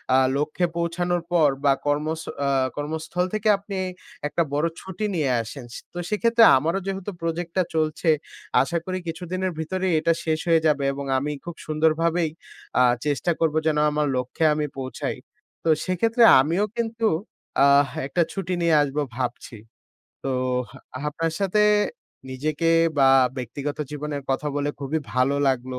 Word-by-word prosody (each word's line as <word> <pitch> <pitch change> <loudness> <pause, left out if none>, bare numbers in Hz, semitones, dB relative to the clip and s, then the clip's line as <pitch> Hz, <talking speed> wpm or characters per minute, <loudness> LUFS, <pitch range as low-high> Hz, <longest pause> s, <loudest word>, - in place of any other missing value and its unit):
আ - - +6 0.2
লক্ষ্যে 155 +4 0
পৌঁছানোর 175 +1 0
পর 160 -4 +5 0.2
বা 140 - +6
কর্মস 155 +3 0 0.3
আ - - +2 0.3
কর্মস্থল 160 +4 -2
থেকে 215 0 -1
আপনি 200 0 -7 0.5
একটা 170 +3 0
বড় 150 +3 +2
ছুটি 190 +3 -5
নিয়ে 150 -5 +1
আসেন। 120 +3 -8
সে - - -7
তো 175 - -5
সেক্ষেত্রে 230 +2 +3
আমারও 165 +7 0
যেহেতু 195 +1 -3
প্রজেক্টটা 170 +2 -1
চলছে, 155 +1 0 0.5
আশা 170 - -1
করি 185 0 -2
কিছুদিনের 180 +3 -3
ভিতরেই 185 +2 -1
এটা 165 +2 +2
শেষ 160 -1 0
হয়ে 165 -1 +5
যাবে 145 -2 +2
এবং 140 0 -5
আমি 145 +3 -1
খুব 175 - -6
সুন্দরভাবেই 160 +2 +1 0.5
আ - - +7 0.2
চেষ্টা 145 +3 0
করব 160 -2 +1
যেন 155 -1 +2
আমার 150 0 0
লক্ষ্যে 125 +5 -1
আমি 150 0 -1
পৌঁছাই। 130 -1 -4 0.5
তো 165 - 0 0.2
সেক্ষেত্রে 225 +6 +2 0.2
আমিও 170 +9 +1
কিন্তু 225 -1 0 0.6
আহ 140 0 +5 0.2
একটা 175 - 0
ছুটি 185 -2 -3
নিয়ে 170 -2 +4
আসবো 145 +1 -1 0.2
ভাবছি। 125 -2 -4 0.7
তোহ 130 -1 0
হা - - -12 0.2
আপনার 155 +3 -2
সাথে 200 +2 +2 0.7
নিজেকে 155 +5 -1 0.3
বা 135 -1 +6 0.3
ব্যক্তিগত 135 +4 -4
জীবনের 150 -1 -4
কথা 150 +3 0
বলে 145 0 0
খুবই 145 +3 -1
ভালো 130 +2 +2
লাগলো। 130 0 -2
160 Hz, 150 wpm, -24 LUFS, 145-175 Hz, 0.7 s, আ